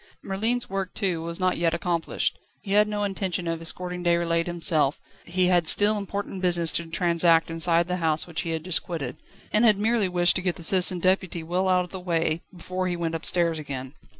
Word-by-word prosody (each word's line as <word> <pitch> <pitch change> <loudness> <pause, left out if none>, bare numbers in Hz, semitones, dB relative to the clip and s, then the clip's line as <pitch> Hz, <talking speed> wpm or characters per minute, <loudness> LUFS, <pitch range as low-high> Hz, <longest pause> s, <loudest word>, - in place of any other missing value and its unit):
Merlin's 225 +5 0
work, 195 -1 -4
too, 185 -6 -1
was 170 +1 -5
not 185 -1 +1
yet 170 -1 +1
accomplished. 170 -1 -2 0.2
He 195 - -6
had 205 - +4
had 210 0 +5
no 210 -1 -2
intention 190 -3 -2
of 165 0 -3
escorting 180 +2 -3
Déroulède 170 -1 +1
himself; 160 -4 +1 0.3
he 180 +1 0
had 175 -2 +2
still 205 +5 +5
important 200 -1 -5
business 170 -3 +1
to 170 +1 -3
transact 170 -1 +2
inside 165 +1 +2
the 180 0 -1
house 160 -3 +1
which 170 -2 -3
he 165 - -5
had 160 -1 -3
just 180 -1 +1
quitted, 155 -6 -5 0.4
and 215 - +4
had 215 -4 +5
merely 215 -1 +1
wished 175 -1 +2
to - - -3
get 180 -1 -1
the 170 - -9
Citizen 185 +1 +4
Deputy 185 -2 0
well 180 +3 -1
out 180 -1 +2
of 180 - -16
the 190 - -6
way, 165 -2 -1
before 185 +1 -4
he 175 - -1
went 165 -1 -3
upstairs 165 0 0
again. 135 -3 -6
175 Hz, 210 wpm, -25 LUFS, 165-185 Hz, 0.4 s, had